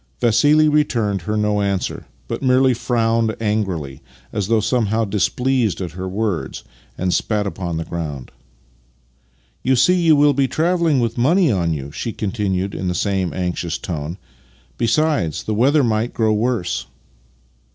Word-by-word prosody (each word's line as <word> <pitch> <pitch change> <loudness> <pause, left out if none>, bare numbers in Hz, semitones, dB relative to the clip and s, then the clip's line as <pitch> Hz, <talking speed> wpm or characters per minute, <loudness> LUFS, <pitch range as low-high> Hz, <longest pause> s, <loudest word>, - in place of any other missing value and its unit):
Vassili 145 +7 +4
returned 115 -10 +1
her 105 +6 -2
no 105 -1 +1
answer, 100 -2 -2 0.2
but - - -4
merely 130 0 +4
frowned 115 -2 0
angrily 95 -11 -2 0.3
as 100 -2 -1
though 115 0 +3
somehow 110 0 +1
displeased 115 +2 0
at 90 -4 -4
her 95 +3 -5
words, 95 -8 -3 0.3
and 90 -1 0
spat 105 -2 0
upon 90 -4 -4
the 80 - -3
ground. 75 -6 -5 0.7
" - - -39
You 130 - +3
see, 130 +9 +4
you 170 -4 +4
will 145 0 +4
be 135 0 +2
travelling 165 -3 +1
with 115 0 -2
money 165 +5 +3
on 85 -5 0
you," 70 -2 -4
she 110 +9 -4
continued 100 -2 -2
in 95 - -3
the 90 - -1
same 95 -3 0
anxious 90 -1 -2
tone. 80 0 -5 0.3
" - - -33
Be 115 - +1
sides, 115 - +1
the 110 - -2
weather 135 +7 +3
might 115 0 0
grow 110 -3 +2
worse." 105 - -1
105 Hz, 160 wpm, -20 LUFS, 90-125 Hz, 0.7 s, Vassili